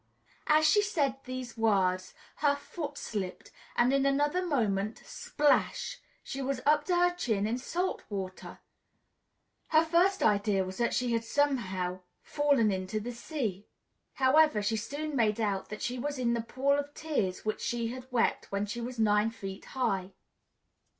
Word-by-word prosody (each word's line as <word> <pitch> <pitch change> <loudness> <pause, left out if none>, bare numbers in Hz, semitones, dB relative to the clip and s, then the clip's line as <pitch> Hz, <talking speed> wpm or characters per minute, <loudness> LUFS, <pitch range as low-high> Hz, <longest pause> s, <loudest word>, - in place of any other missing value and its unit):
As 310 0 +5
she 415 +7 +5
said 290 -10 0
these 255 -2 -6
words, 190 -5 +1 0.2
her 290 -1 +3
foot 290 0 -6
slipped, 195 -4 -5 0.2
and 245 +2 +3
in 275 0 +3
another 290 +6 +2
moment, 220 - 0
splash! 300 +11 0 0.2
she 275 - -5
was 270 0 -1
up 295 0 +4
to 360 - +1
her 355 0 +3
chin 220 - 0
in 230 +4 -1
salt 355 +8 -2
water. 190 -3 -6 1.1
Her 315 0 +4
first 350 +4 +3
idea 205 -2 +3
was 185 0 -7
that 235 -1 +1
she 250 -1 0
had 230 0 0
somehow 200 -9 0 0.2
fallen 280 -7 +2
into 190 +2 -2
the 235 +3 -5
sea. 235 - -4 0.5
However, 265 -4 +4
she 215 +2 +1
soon 285 +7 -4
made 220 -3 +2
out 200 -3 -1
that 215 - -6
she 250 +1 -2
was 285 +2 -3
in 240 -2 +1
the 235 - 0
pool 260 +4 0
of 285 0 -5
tears 220 -14 -2
which 215 - -2
she 235 -2 -1
had 255 +1 -8
wept 240 -2 0
when 200 +1 0
she 235 +4 -5
was 245 +1 -5
nine 210 0 +3
feet 195 -4 -8
high. 195 -6 0
240 Hz, 165 wpm, -30 LUFS, 210-290 Hz, 1.1 s, As